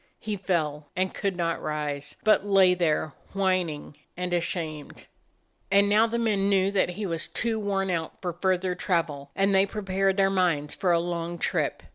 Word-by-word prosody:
He 215 Hz, -1 st, -3 dB
fell, 155 Hz, -6 st, -2 dB
and 185 Hz, 0 st, 0 dB
could 195 Hz, -2 st, -2 dB
not 165 Hz, -1 st, -1 dB
rise, 150 Hz, -1 st, -3 dB
but 215 Hz, -2 st, +4 dB
lay 195 Hz, -3 st, +5 dB
there, 155 Hz, -4 st, 0 dB, 0.2 s
whining 185 Hz, -7 st, -1 dB, 0.2 s
jand 180 Hz, 0 st, -3 dB
ashamed. 165 Hz, -3 st, -3 dB, 0.6 s
And 200 Hz, +1 st, +4 dB
now 215 Hz, +3 st, +4 dB
the 235 Hz, +1 st, -2 dB
men 210 Hz, -4 st, +1 dB
knew 195 Hz, -1 st, +3 dB
that 195 Hz, -3 st, +2 dB
he 200 Hz, +4 st, -4 dB
was 165 Hz, -3 st, -2 dB
too 225 Hz, -1 st, -1 dB
worn 195 Hz, -2 st, -1 dB
out 165 Hz, -2 st, -3 dB
for 175 Hz, -2 st, -3 dB
further 185 Hz, +1 st, 0 dB
travel, 165 Hz, -6 st, -1 dB
and 195 Hz, +1 st, +2 dB
they 195 Hz, +1 st, +4 dB
prepared 195 Hz, -2 st, 0 dB
their 195 Hz, -1 st, +3 dB
minds 170 Hz, -6 st, +1 dB
for 180 Hz, -, 0 dB
a 170 Hz, -, +4 dB
long 170 Hz, 0 st, -3 dB
trip. -, -, -1 dB
185 Hz, 175 wpm, -26 LUFS, 165-195 Hz, 0.6 s, lay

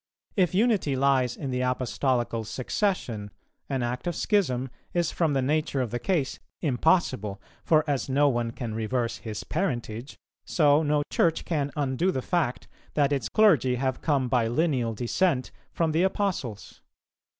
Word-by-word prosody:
If 185 Hz, -3 st, +2 dB
unity 205 Hz, -, +2 dB
lies 130 Hz, -2 st, +2 dB
in 140 Hz, -4 st, -4 dB
the 125 Hz, 0 st, -1 dB
Apostolical 125 Hz, -2 st, 0 dB
succession, 120 Hz, -, -2 dB, 0.4 s
an 135 Hz, -3 st, -1 dB
act 125 Hz, +7 st, -3 dB
of 175 Hz, -, -1 dB
schism 135 Hz, -, +1 dB, 0.2 s
is 175 Hz, -2 st, +1 dB
from 160 Hz, -4 st, +1 dB
the 135 Hz, -1 st, +1 dB
nature 150 Hz, 0 st, 0 dB
of 125 Hz, -4 st, -1 dB
the 120 Hz, -, -2 dB
case 160 Hz, -7 st, -1 dB, 0.2 s
impossible; 130 Hz, -, +1 dB, 0.2 s
for 155 Hz, -1 st, +4 dB
as 140 Hz, -3 st, -1 dB
no 145 Hz, +2 st, +4 dB
one 120 Hz, -3 st, 0 dB
can 115 Hz, -1 st, -5 dB
reverse 115 Hz, +2 st, -1 dB
his 110 Hz, -2 st, -6 dB
parentage, 125 Hz, -, -3 dB, 0.3 s
so 150 Hz, -2 st, +3 dB
no 150 Hz, -1 st, +1 dB
Church 165 Hz, -1 st, +1 dB
can 145 Hz, -4 st, -1 dB
undo 145 Hz, +4 st, 0 dB
the 130 Hz, -8 st, -1 dB
fact 165 Hz, -8 st, -1 dB, 0.3 s
that 145 Hz, -1 st, +3 dB
its 125 Hz, -6 st, -1 dB
clergy 155 Hz, -, +4 dB
have 130 Hz, 0 st, -1 dB
come 140 Hz, -5 st, +1 dB
by 120 Hz, -2 st, +2 dB
lineal 125 Hz, -4 st, 0 dB
descent 130 Hz, -, 0 dB, 0.2 s
from 165 Hz, -2 st, 0 dB
the 160 Hz, +2 st, +2 dB
Apostles. 185 Hz, -, -2 dB
135 Hz, 155 wpm, -27 LUFS, 120-160 Hz, 0.4 s, for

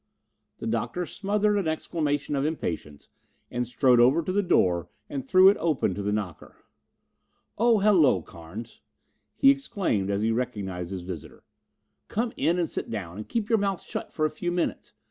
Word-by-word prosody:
The -, -, -7 dB
Doctor 180 Hz, -2 st, -1 dB
smothered 205 Hz, +2 st, 0 dB
an 185 Hz, -, -2 dB
exclamation 150 Hz, -2 st, -1 dB
of 135 Hz, -, 0 dB
impatience 85 Hz, -, -4 dB, 0.4 s
and 120 Hz, 0 st, -2 dB
strode 125 Hz, 0 st, +4 dB
over 130 Hz, +8 st, +5 dB
to 185 Hz, -, -2 dB
the 205 Hz, +2 st, +2 dB
door 90 Hz, -, +2 dB, 0.2 s
and 135 Hz, -2 st, -3 dB
threw 185 Hz, +8 st, +6 dB
it 200 Hz, -, +6 dB
open 150 Hz, -, +1 dB
to 100 Hz, -, -4 dB
the 100 Hz, +1 st, -1 dB
knocker. 100 Hz, -6 st, -4 dB, 1.0 s
"Oh, 235 Hz, +1 st, +4 dB
hello, 175 Hz, -, +4 dB
Carnes," 90 Hz, +8 st, -10 dB, 0.5 s
he 275 Hz, -, +6 dB
exclaimed 200 Hz, -, -1 dB
as 100 Hz, +1 st, 0 dB
he 115 Hz, -, +2 dB
recognized 100 Hz, -7 st, -3 dB
his 95 Hz, -2 st, -5 dB
visitor. 90 Hz, -2 st, -8 dB, 0.6 s
"Come 230 Hz, +2 st, -2 dB
in 170 Hz, +2 st, +1 dB
and 175 Hz, -2 st, +1 dB
sit -, -, -5 dB
down 95 Hz, -5 st, -5 dB
and 105 Hz, -, -7 dB
keep 225 Hz, -3 st, -1 dB
your 225 Hz, -2 st, +3 dB
mouth 195 Hz, -2 st, 0 dB
shut -, -, -6 dB
for 155 Hz, -, 0 dB
a 155 Hz, -, 0 dB
few 175 Hz, +3 st, -3 dB
minutes. 175 Hz, 0 st, -2 dB
145 Hz, 175 wpm, -26 LUFS, -, 1.0 s, threw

